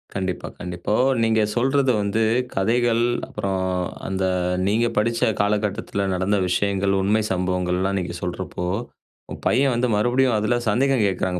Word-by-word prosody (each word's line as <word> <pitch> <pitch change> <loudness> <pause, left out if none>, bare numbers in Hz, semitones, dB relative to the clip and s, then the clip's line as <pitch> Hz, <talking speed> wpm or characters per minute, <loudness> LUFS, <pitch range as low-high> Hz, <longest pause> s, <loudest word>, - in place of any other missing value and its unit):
கண்டிப்பா, 95 -2 -3
கண்டிப்பா. - - -7 0.2
இப்போ, 105 - 0 0.3
நீங்க 110 -1 +2
சொல்றது 135 +2 +2
வந்து 100 +2 0 0.3
கதைகள், 115 +3 +2 0.2
அப்பறம் 95 -1 -2 0.4
அந்த 95 0 -1 0.4
நீங்க 115 +4 +2
படிச்ச 115 +2 +1 0.2
காலகட்டத்துல 100 -1 -1
நடந்த 95 +3 +1
விஷயங்கள், 100 +1 +1
உண்மை 105 +3 +2
சம்பவங்கள்லாம் 90 +1 0
நீங்க 90 -1 -4
சொல்றப்போ, 90 0 -4 0.6
உங்க - - -7
பையன் 135 0 +3
வந்து 125 +1 +1
மறுபடியும் 120 +3 +2
அதுல 110 +3 +1
சந்தேகம் 130 +2 +2
கேக்குறாங்க 95 -1 -1
100 Hz, 130 wpm, -22 LUFS, 95-115 Hz, 0.6 s, பையன்